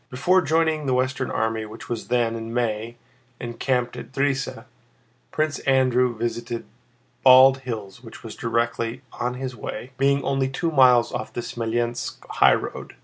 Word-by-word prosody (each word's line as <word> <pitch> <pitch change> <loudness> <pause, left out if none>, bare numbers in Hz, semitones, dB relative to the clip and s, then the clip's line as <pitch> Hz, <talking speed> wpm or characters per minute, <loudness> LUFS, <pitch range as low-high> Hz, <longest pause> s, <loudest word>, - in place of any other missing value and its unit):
Before 175 +9 +3
joining 160 -1 +1
the 130 - +2
Western 130 0 -1
Army 110 0 -1
which 110 +2 -11
was 120 -2 -4
then, 120 -2 +1
in 115 0 -6
May, 115 -1 -2 0.4
encamped 120 +1 -2
at 125 - -9
Drissa, 135 -3 -1 0.6
Prince 155 -1 -1
Andrew 125 -3 +2
visited 115 0 -3 0.6
Bald 130 +1 +7
Hills 115 -4 -7
which 115 - -12
was 115 - -8
directly 115 +2 -2
on 125 +1 -3
his 130 0 -5
way, 120 +3 -7
being 140 0 +2
only 135 0 0
two 165 +5 -2
miles 125 -5 +5
off 110 - -4
the 120 - -4
Smolénsk 120 0 -3
highroad. - - +1
125 Hz, 145 wpm, -23 LUFS, 115-135 Hz, 0.6 s, Bald